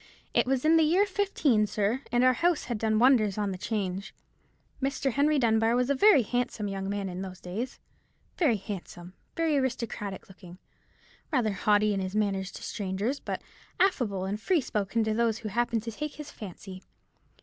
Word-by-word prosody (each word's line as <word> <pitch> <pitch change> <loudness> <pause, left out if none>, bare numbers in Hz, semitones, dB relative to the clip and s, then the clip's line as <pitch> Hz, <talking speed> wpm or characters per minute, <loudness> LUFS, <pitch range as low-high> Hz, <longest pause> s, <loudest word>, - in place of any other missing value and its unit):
It - - +3
was 265 +1 0
in 325 +1 +6
the 320 - +5
year 355 +6 +4
'15, 325 - +1
sir, 210 +5 0
and 245 0 +3
our 255 0 +6
house 340 +5 +1
had 240 -4 -4
done 220 0 +1
wonders 225 -5 +4
on 200 -2 -1
'Change. 195 -1 -3 0.7
Mr. 270 0 0
Henry 290 +4 +2
Dunbar 225 -2 +3
was 250 +2 +1
a - - +5
very 290 - +6
handsome 235 -2 -2
young 195 -1 -4
man 200 -1 -2
in 180 0 -5
those 185 -1 -7
days—very 235 - -4
handsome, 180 -3 -8 0.2
very 325 -3 +2
aristocratic 235 -6 -3
looking, 180 -2 -13 0.7
rather 240 -8 +1
haughty 210 +1 +2
in 195 - -1
his 190 +1 -4
manners 195 -2 0
to - - -9
strangers, 205 +7 -2
but - - -5 0.4
affable 235 - +1
and 205 +3 -3
free 365 - +2
spoken 210 -1 -1
to 220 0 0
those 225 -1 +1
who 220 -2 -5
happened 235 0 0
to 230 - -4
take 300 +6 -5
his 300 -1 -8
fancy. 190 -2 -9
220 Hz, 175 wpm, -28 LUFS, 195-265 Hz, 0.7 s, in